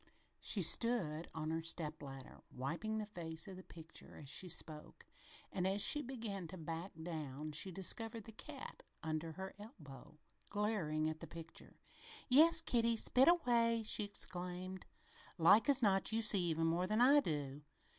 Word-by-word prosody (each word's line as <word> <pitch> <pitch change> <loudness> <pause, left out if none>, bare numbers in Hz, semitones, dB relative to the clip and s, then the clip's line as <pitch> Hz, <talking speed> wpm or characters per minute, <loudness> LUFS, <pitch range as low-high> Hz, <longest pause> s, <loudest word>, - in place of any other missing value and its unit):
She 195 - 0
stood 170 -6 +2
on 155 0 -3
her 165 0 -1
step 160 -2 -1
ladder, 135 -2 -10
wiping 170 +12 -4
the 215 - -3
face 165 -3 -5
of 190 - -8
the 185 - -9
picture 165 -3 -11
as 140 - -9
she 180 +5 -1
spoke, 155 -2 -2 0.5
and 185 -1 -1
as 195 +2 0
she 295 +8 +6
began 225 - -5
to 185 - -9
back 165 +3 -6
down 155 -3 -5
she 165 +5 -2
discovered 225 +5 -1
the 225 - -11
cat 275 +5 -9 0.2
under 160 +1 -3
her 190 +3 -7
elbow, 155 - -12 0.3
glaring 200 -8 -1
at 155 0 -4
the - - -7
picture. 165 0 -11 0.5
"Yes, 325 +5 +7
Kitty! 235 -6 +2
Spit 255 +4 +5
away!" 235 -9 +3
she 210 - +2
exclaimed. 185 -2 -4 0.5
"Like 200 - +5
as 270 -3 +4
not 195 -1 +3
you 225 +1 0
see 210 -3 +3
even 165 -1 +1
more 170 +3 +1
than 215 +3 0
I 275 +4 +7
do!" 145 - -3
185 Hz, 165 wpm, -37 LUFS, 160-225 Hz, 0.5 s, Yes